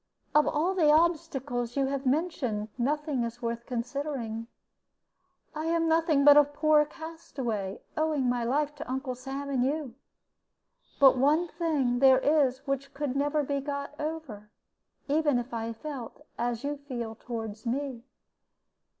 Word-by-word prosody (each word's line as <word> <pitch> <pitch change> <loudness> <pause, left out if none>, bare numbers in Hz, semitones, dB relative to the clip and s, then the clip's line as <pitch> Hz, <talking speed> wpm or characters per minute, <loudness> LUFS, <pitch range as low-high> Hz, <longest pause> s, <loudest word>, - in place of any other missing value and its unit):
Of 300 0 +5
all 320 +5 +1
the 335 -5 +3
obstacles 275 -7 +1
you 275 - +3
have 275 0 -2
mentioned, 255 -8 0
none 285 +1 0
is 235 +1 -5
worth 235 0 -4
considering. 245 -2 -3 1.1
I 310 +1 -4
am 330 0 +1
nothing 320 -3 +3
but 290 0 +9
a 295 - +9
poor 300 +1 +3
castaway, 265 - -5
owing 310 -4 +1
my 245 -1 +1
life 290 +5 0
to 310 0 -7
Uncle 260 0 -2
Sam 270 +3 -6
and 255 -3 +2
you. 280 -2 -1 1.1
But 265 -2 +7
one 305 +6 +3
thing 285 -9 0
there 265 -1 +7
is 270 -1 +2
which 275 0 -3
could 280 -2 -2
never 290 +2 +1
be 280 0 -1
got 280 0 -4
over, 300 -10 -5 0.6
even 295 -2 +2
if 245 +1 -4
I 230 0 -2
felt 255 0 -8
as 240 0 -2
you 290 +1 -2
feel 245 -6 -5
toward 225 -2 -6
me. 255 0 -2
275 Hz, 145 wpm, -29 LUFS, 245-300 Hz, 1.1 s, but